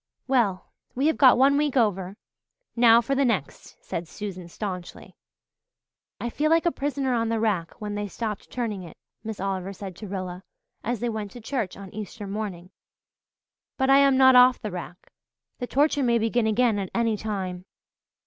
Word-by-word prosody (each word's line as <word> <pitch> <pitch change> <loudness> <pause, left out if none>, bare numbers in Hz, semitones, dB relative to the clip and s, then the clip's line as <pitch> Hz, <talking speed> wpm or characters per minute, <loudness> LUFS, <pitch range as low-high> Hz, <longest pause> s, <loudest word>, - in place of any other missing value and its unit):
"Well, 230 -8 +1 0.2
we 265 +3 0
have 315 - +2
got 260 -4 +7
one 275 +2 +5
week 290 -2 +1
over 195 -4 0 0.6
now 235 -1 +6
for 275 +4 -2
the 275 +1 +2
next," 210 - -2
said 170 0 -4
Susan 185 -2 -7
staunchly. 180 -1 -7 1.0
"I 240 - -3
feel 305 +5 0
like 330 +1 +3
a 345 - +3
prisoner 275 -3 -1
on 230 -1 0
the 230 -1 0
rack 200 -7 -1
when 210 -1 -4
they 205 0 -3
stopped 210 +1 -5
turning 225 -6 -3
it," 170 -3 -11 0.3
Miss 220 -2 -6
Oliver 195 0 -3
said 190 -1 -8
to 215 - -8
Rilla, 185 -2 -5 0.4
as 240 -3 -2
they 240 - 0
went 215 -2 -4
to 245 - -9
church 230 -4 -3
on 195 -2 -10
Easter 210 0 -7
morning. 195 -3 -5 1.1
"But 265 0 +2
I 275 - +7
am 275 -1 +5
not 260 -1 +7
off 250 0 +7
the 210 - -5
rack. 175 0 -8 0.5
The 245 - -3
torture 290 +2 +2
may 240 -2 +3
begin 225 0 +1
again 220 -1 +2
at 190 -2 -4
any 230 -2 +2
time." 190 -4 -4
220 Hz, 180 wpm, -25 LUFS, 195-250 Hz, 1.1 s, got